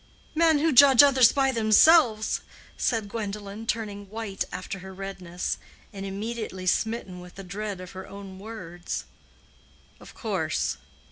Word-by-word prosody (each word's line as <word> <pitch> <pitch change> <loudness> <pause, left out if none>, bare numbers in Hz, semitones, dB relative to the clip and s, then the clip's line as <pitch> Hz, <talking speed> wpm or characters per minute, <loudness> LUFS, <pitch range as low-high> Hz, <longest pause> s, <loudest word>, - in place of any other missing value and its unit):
"Men 320 -1 +4
who 320 +2 +2
judge 275 -1 +8
of 285 - +7
others 260 -4 +6
by 270 -1 +2
themselves," 225 +1 +4 0.3
said 225 -3 0
Gwendolen, 205 0 -6
turning 205 -3 -3
white 215 -2 -4
after 195 +1 -6
her 190 +1 -9
redness, 185 -2 -4 0.3
and 195 0 -6
immediately 205 -1 -5
smitten 195 -1 -1
with 180 +1 -13
a 195 - -7
dread 200 +1 -5
of 185 0 -9
her 190 0 -9
own 195 -1 -10
words. 185 -5 -6 1.0
"Of - - -14
course. - - -1
205 Hz, 140 wpm, -26 LUFS, 190-230 Hz, 1.0 s, judge